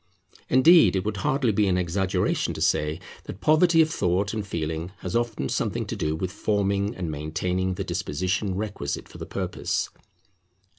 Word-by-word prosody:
Indeed 160 - +6
it 95 0 -1
would 105 -1 -2
hardly 130 +3 +1
be 105 0 +2
an 90 -1 +2
exaggeration 90 +2 0
to - - -6
say 75 +2 +1 0.3
that 95 - -8
poverty 160 +3 +5
of 155 - -3
thought 95 - 0
and 110 -2 -2
feeling 80 -2 -3
has 90 - -4
often 120 -2 0
something - - -1
to - - -4
do 75 0 -1
with 90 +3 -3
forming 100 +1 0
and 85 -4 -3
maintaining 90 +5 -2
the - - -3
disposition 95 +1 -2
requisite 100 -8 -4
for - - -13
the - - -6
purpose. - - -2
95 Hz, 165 wpm, -25 LUFS, 90-110 Hz, 0.3 s, Indeed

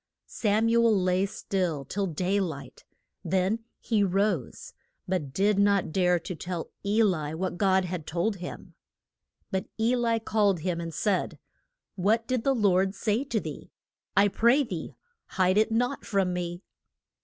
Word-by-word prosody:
Sam 215 +1 +1
u 235 0 +4
el 220 -4 +4
lay 185 +1 +1
still 180 -8 -2
till 195 +7 -2
day 185 +4 0
light. 160 -8 -5 0.4
Then 190 +5 +1 0.2
he 215 -3 +1
rose, 195 - -1 0.3
but 175 -7 -2
did 200 +6 +2
not 200 -4 +3
dare 180 0 +3
to 175 - -6
tell 175 0 -5
E 210 +3 +3
li 160 -7 0
what 180 +1 -3
God 190 -2 +3
had 175 -3 -5
told 180 +5 -1
him. 180 0 -8 0.8
But 190 -1 -2
E 230 +3 +3
li 235 -2 +1
called 205 -5 +1
him 170 0 -2
and 165 0 -5
said, 185 +4 -1 0.6
What 215 +5 +1
did 255 -2 -1
the 270 -1 +2
Lord 195 -3 +2
say 215 +5 0
to 235 -5 -1
thee? - - -8 0.5
I 200 +1 +6
pray 235 +8 +3
thee 180 -10 -6 0.3
hide 185 +2 +2
it 220 +1 +2
not 245 +4 0
from 195 -3 0
me. 175 +1 -4
195 Hz, 160 wpm, -27 LUFS, 180-215 Hz, 0.8 s, I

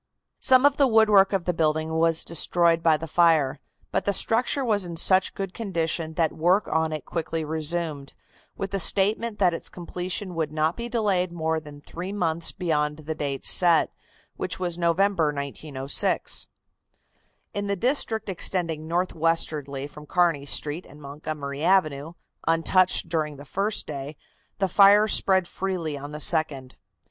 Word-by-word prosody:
Some 260 +1 +4
of 285 -1 +3
the 280 - +4
woodwork 215 -4 +4
of 195 -3 -1
the 180 - 0
building 160 0 -1
was 165 0 +2
destroyed 170 0 +2
by 160 -2 +3
the 160 - -6
fire, 160 -4 +2 0.3
but - - -1
the 200 - +1
structure 250 +7 +1
was 210 -4 +1
in 170 -2 -6
such 185 +2 +3
good 195 -2 -5
condition 165 -6 -3
that 165 -2 +1
work 180 +6 +1
on 160 0 0
it 155 -1 -5
was - - -21
quickly 165 -1 -3
resumed, 155 -2 -2 0.4
with 195 - -4
the 195 - -1
statement 210 +4 +2
that 180 -4 +2
its 165 - -5
completion 180 +2 -4
would 160 -3 -2
not 155 +2 0
be 235 0 -6
delayed 200 -6 0
more 160 -1 -2
than 145 -2 -13
three 175 +5 -7
months 170 -5 0
beyond 150 -5 -1
the 155 0 -5
date 140 -3 -4
set, 170 -3 +4 0.5
which - - -4
was 175 -2 -1
November, 175 +1 +1
1906. 140 -1 0 1.1
In 205 0 -3
the 200 - -1
district 230 0 0
extending 165 -4 -3
northwestwardly 160 -5 -1
from 150 +1 -13
Kearney 170 -5 +1
Street 150 +5 0
and 145 - -15
Montgomery 145 0 -6
Avenue, 160 -4 +1 0.3
untouched 170 +3 +2
during 155 -3 -2
the 145 - -11
first 200 +8 -2
day, 145 0 -7 0.4
the 195 - 0
fire 200 +3 +5
spread 190 -3 +3
freely 180 -6 -4
on 145 +1 -8
the 150 - -7
second. 150 -5 +1
165 Hz, 160 wpm, -24 LUFS, 155-190 Hz, 1.1 s, fire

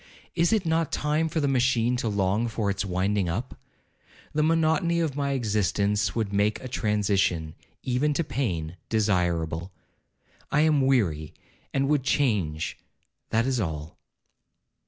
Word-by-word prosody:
Is 170 +2 +2
it 215 -5 +2
not 160 -1 +1
time 150 +2 0
for 160 - -1
the 145 - +1
machine 125 -2 +2
to 115 - -1
long 100 +3 +1
for 110 -3 -1
its 100 +1 -2
winding 95 0 0
up? 115 +10 -3 0.8
The 150 - +1
monotony 165 +1 +2
of 160 -5 -1
my 140 -1 0
existence 105 -3 0
would 110 -3 -1
make 105 +2 +2
a 130 - -7
transition, 100 - 0 0.3
even 130 +4 +1
to 170 - +1
pain, 90 - -3
desirable. 90 -5 0 0.8
I 150 - +3
am 155 -2 +4
weary, 85 - +1 0.4
and 135 0 +1
would 150 -1 +2
change—that 110 - -2
is 130 -2 0
all.' 80 -5 -4
115 Hz, 135 wpm, -26 LUFS, 95-140 Hz, 0.8 s, am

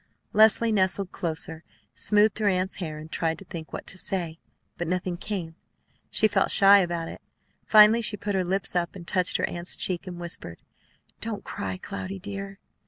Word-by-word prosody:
Leslie 220 +2 +5
nestled 190 -2 +1
closer, 160 -1 -3 0.3
smoothed 210 0 +3
her 215 - +1
aunt's 185 -1 0
hair, 155 -5 -5
and 155 +1 -10
tried 165 -1 -1
to 195 - -12
think 165 -3 -8
what - - -6
to 190 - -5
say; 170 -4 -2 0.4
but 175 - -4
nothing 180 0 -2
came. 175 -3 -5 0.6
She 215 - +4
felt 210 - +1
shy 200 0 +7
about 170 -3 -1
it. - - -9 0.5
Finally 215 +2 +7
she 215 -2 -1
put 205 +1 -3
her 190 -1 +1
lips 190 +1 -1
up, 175 +1 -1
and 175 -3 -10
touched 185 -2 +1
her - - 0
aunt's 175 +1 -2
cheek, 185 0 -2
and 175 -1 -7
whispered, 170 - 0 0.6
"Don't 215 -3 -4
cry, 205 -2 -4
Cloudy 195 0 -6
dear!" 195 0 -7
185 Hz, 180 wpm, -26 LUFS, 170-205 Hz, 0.6 s, shy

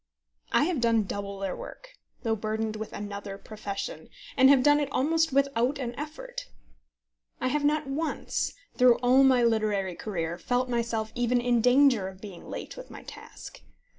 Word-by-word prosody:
I - - +4
have 320 -5 0
done 230 -2 +3
double 200 0 -5
their 195 -1 -3
work, - - -10 0.3
though 225 -2 +1
burdened 215 0 -2
with 215 0 -6
another 200 -1 -6
profession, 205 -1 -6 0.3
and 265 0 +6
have 275 -2 +6
done 290 +1 +5
it 285 -2 -1
almost 320 +4 +2
without 275 -1 +1
an 245 -3 -4
effort. 310 - -7 0.9
I 255 - 0
have 295 +2 0
not 300 +1 +2
once, 295 +4 -2 0.2
through 250 -2 +6
all 255 +2 +6
my 260 -2 +5
literary 215 -5 +1
career, 170 -3 -4
felt 250 +6 0
myself 230 -2 -1
even 245 0 +1
in 240 -1 +2
danger 250 -4 +4
of 190 0 -10
being 195 -4 -10
late - - -6
with - - -10
my - - -10
task. - - -11
240 Hz, 165 wpm, -28 LUFS, 210-275 Hz, 0.9 s, and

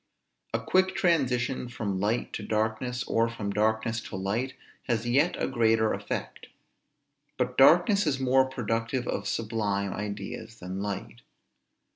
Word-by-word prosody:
A - - 0
quick 185 0 +2
transition 130 -7 +1
from 100 -5 -3
light 110 +5 -1
to - - -4
darkness, 110 +3 -1
or 115 0 +1
from 105 -3 -4
darkness 110 +2 +1
to - - -7
light, 110 +8 -2 0.3
has 120 -2 0
yet 140 +8 +3
a - - 0
greater 115 -3 +2
effect. - - -5 0.9
But 125 0 -1
darkness 175 +8 +6
is 135 -3 +1
more 130 0 +4
productive 120 -1 -2
of 100 0 -2
sublime 105 -3 -1
ideas 105 +2 -6
than 95 +2 -5
light. 100 -12 -5
115 Hz, 135 wpm, -28 LUFS, 105-130 Hz, 0.9 s, darkness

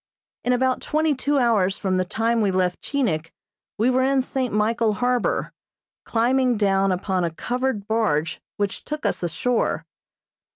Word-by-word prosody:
In 250 - +1
about 255 +1 +1
twenty 310 0 +1
two 285 +2 0
hours 215 -7 +2
from 185 -2 0
the 185 - +1
time 225 +4 0
we 205 - +2
left 185 -1 0
Chinik 175 - -1 0.5
we 230 +4 +3
were 255 +1 +2
in 265 0 +2
St. 255 -1 -2
Michael 215 +1 +1
harbor, 245 +2 0 0.5
climbing 250 +1 +2
down 195 -1 +2
upon 185 0 -1
a 170 - +1
covered 245 +4 -2
barge 185 -9 0 0.2
which 205 -1 -2
took 300 0 -5
us - - 0
ashore. 225 +8 -1
225 Hz, 155 wpm, -23 LUFS, 195-255 Hz, 0.5 s, we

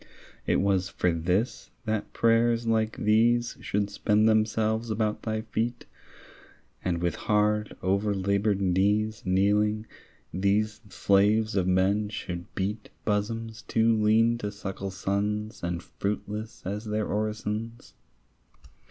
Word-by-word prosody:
It - - +3
was 95 -2 +1
for 90 - +1
this, 90 +8 -1 0.2
that 110 -1 -2
prayers 115 0 +2
like 110 -1 +1
these 115 +3 +3
Should 100 0 -1
spend 105 +1 +2
themselves 110 +1 +1
about 110 -1 -1
thy 110 -1 -2
feet, 115 +2 -3 1.0
And 90 -2 0
with 85 - +1
hard 105 0 0
overlaboured 100 +1 +1
knees 100 +3 +1
Kneeling, 105 +3 +2 0.5
these 105 +3 +1
slaves 105 +4 +2
of 95 -2 +1
men 95 +3 +2
should 85 -4 -5
beat 105 +3 -3 0.2
Bosoms 110 +2 -2
too 115 0 +2
lean 110 +2 +3
to 105 -2 -3
suckle 100 -1 -5
sons 105 +3 -2
And 85 0 -3
fruitless 105 +2 -4
as 105 +4 -4
their 105 0 -1
orisons? 110 +2 -3
105 Hz, 115 wpm, -27 LUFS, 100-110 Hz, 1.0 s, It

